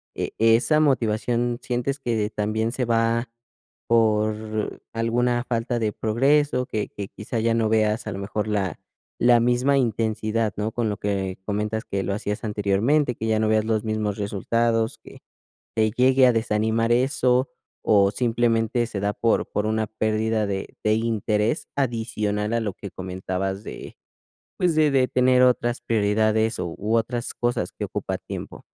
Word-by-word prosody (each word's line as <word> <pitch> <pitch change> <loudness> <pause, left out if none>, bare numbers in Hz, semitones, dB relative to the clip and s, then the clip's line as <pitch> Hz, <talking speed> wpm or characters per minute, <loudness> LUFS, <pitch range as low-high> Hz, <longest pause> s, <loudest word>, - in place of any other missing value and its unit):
¿e - - -3
esa 115 +7 +4
motivación 120 -3 +1
sientes 125 +3 -2
que 110 -5 -1
también 110 +2 -1
se 130 -1 -1
va 115 +1 +1 0.6
por 110 -1 +1
alguna 120 +1 +1
falta 120 0 -1
de 110 -2 0
progreso? 130 +3 +2
Que 105 -1 -3
que 100 -1 -6
quizá 110 +2 -5
ya 115 +1 +2
no 115 -1 +1
veas 110 0 +1
a - - -2
lo 95 - -6
mejor 105 +1 -3
la 100 -5 -1 0.4
la 120 -1 +6
misma 125 +4 +2
intensidad, 110 -3 0
¿no?, 105 +2 -1
con 115 -1 -1
lo 105 - -2
que 95 -2 -2
comentas 105 +1 -2
que 95 0 -2
lo 100 - -2
hacías 105 +1 -3
anteriormente, 110 +7 +1
que 110 - -4
ya 110 -1 +2
no 110 0 +1
veas 110 0 +2
los 110 -1 0
mismos 110 -2 -1
resultados, 115 +3 0
que - - -15 0.6
te 110 -1 +3
llegue 130 +3 +4
a - - +4
desanimar 110 +1 +1
eso. 130 0 +2 0.4
O 100 -2 +5
¿simplemente 120 -1 +1
se 105 -3 -5
da 100 +1 0
por 115 -1 +1
por 105 - -1
una 110 0 0
pérdida 110 0 0
de 95 -1 -4
de 105 - +3
interés 110 - 0
adicional 110 -4 -1
a 115 - +1
lo 105 -3 -2
que 100 - -8
comentabas 95 +2 -4
de, - - -9 0.6
pues, 175 -3 +1
de 155 -1 +4
de 130 -2 +3
tener 125 0 +3
otras 120 -1 +2
prioridades 110 0 +1
o 90 - -2
u 105 +3 -1
otras 120 +1 -2
cosas 120 0 -1
que - - -5
ocupa - - -3
tiempo? - - -8
110 Hz, 165 wpm, -24 LUFS, 105-120 Hz, 0.6 s, la